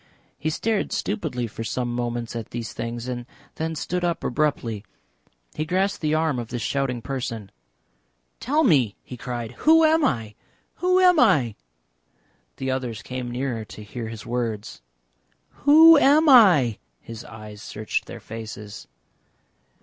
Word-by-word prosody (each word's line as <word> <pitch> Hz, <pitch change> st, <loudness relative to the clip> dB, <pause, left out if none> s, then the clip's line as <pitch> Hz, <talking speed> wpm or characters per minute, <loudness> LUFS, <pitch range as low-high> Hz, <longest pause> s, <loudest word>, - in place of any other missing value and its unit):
He 155 Hz, -, -1 dB
stared 215 Hz, +6 st, -1 dB
stupidly 130 Hz, -, -2 dB
for 115 Hz, 0 st, -6 dB
some 120 Hz, +1 st, -2 dB
moments 120 Hz, -1 st, -3 dB
at 115 Hz, -2 st, -5 dB
these 115 Hz, -1 st, -5 dB
things 115 Hz, +1 st, -5 dB
and 120 Hz, -1 st, -5 dB, 0.3 s
then 160 Hz, 0 st, -2 dB
stood 180 Hz, +4 st, -3 dB
up 170 Hz, -1 st, -1 dB
abruptly; 120 Hz, -7 st, -1 dB, 0.7 s
he 155 Hz, -, -2 dB
grasped 185 Hz, +5 st, 0 dB
the 155 Hz, -1 st, +1 dB
arm 155 Hz, -5 st, +1 dB
of 120 Hz, -, -5 dB
this 120 Hz, -1 st, -4 dB
shouting 125 Hz, -1 st, -1 dB
person. 115 Hz, -7 st, -5 dB, 0.9 s
"Tell 295 Hz, +6 st, +1 dB
me!" 135 Hz, -, +3 dB
he 125 Hz, -, -9 dB
cried. 120 Hz, -2 st, -5 dB
"Who 325 Hz, +1 st, +6 dB
am 320 Hz, 0 st, +4 dB
I? 115 Hz, -, 0 dB, 0.4 s
Who 365 Hz, +1 st, +3 dB
am 360 Hz, -3 st, +5 dB
I?" 135 Hz, -, +4 dB, 1.0 s
The 130 Hz, 0 st, -2 dB
others 125 Hz, -4 st, -4 dB
came 125 Hz, -1 st, -5 dB
nearer 120 Hz, -2 st, -3 dB
to 105 Hz, -, -11 dB
hear 115 Hz, +2 st, -6 dB
his 110 Hz, -2 st, -8 dB
words. 115 Hz, -, -4 dB, 0.8 s
"Who 315 Hz, +2 st, +9 dB
am 300 Hz, +4 st, +5 dB
I?" 180 Hz, -, +6 dB, 0.2 s
His 115 Hz, 0 st, -9 dB
eyes 105 Hz, -1 st, -11 dB
searched 105 Hz, -2 st, -3 dB
their -, -, -8 dB
faces. 110 Hz, -2 st, -9 dB
125 Hz, 145 wpm, -24 LUFS, 115-170 Hz, 1.0 s, Who